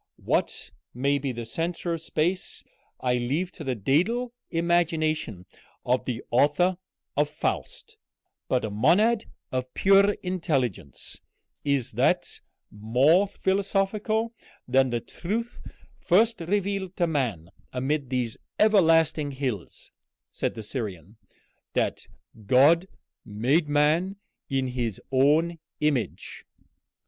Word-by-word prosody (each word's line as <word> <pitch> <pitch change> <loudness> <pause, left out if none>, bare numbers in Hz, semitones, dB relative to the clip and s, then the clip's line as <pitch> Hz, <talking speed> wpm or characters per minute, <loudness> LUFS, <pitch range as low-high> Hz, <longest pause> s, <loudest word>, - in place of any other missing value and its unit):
What - - -1 0.2
may 140 +3 +1
be 135 -1 -2
the 120 -1 -6
centre 170 +7 -3
of 165 - -4
space 170 +3 -2 0.4
I 125 -1 +1
leave 145 +10 -1
to 155 - -9
the 130 -3 -1
dædal 185 - +1 0.2
imagination 160 - 0 0.4
of 125 +1 +1
the 125 -2 -3
author 150 +8 +3 0.4
of 150 +1 +2
'Faust'; 150 - -4 0.5
but 125 -3 +1
a 110 - -4
monad 200 - +3 0.3
of 130 0 -3
pure 195 +1 +5
intelligence 135 - -3 0.4
is 140 -4 0
that - - 0 0.3
more 130 - +3
philosophical 200 +4 0 0.3
than 130 +1 +3
the 120 -1 -1
truth 225 - -4 0.4
first 220 +4 +3
revealed 195 +1 -1
to 175 - +3
man 120 - -2 0.2
amid 135 +1 -1
these 125 -3 -2 0.2
everlasting 165 -8 +4
hills," 130 - -5 0.4
said - - -2
the 110 - -6
Syrian, 105 - -6 0.6
"that - - -1 0.4
God 155 - +5 0.4
made 130 +10 +1
man 155 +6 +2 0.3
in 135 -1 0
his 120 -5 -3
own 155 +6 +3 0.2
image?" 145 -6 -2
150 Hz, 110 wpm, -26 LUFS, 125-180 Hz, 0.6 s, pure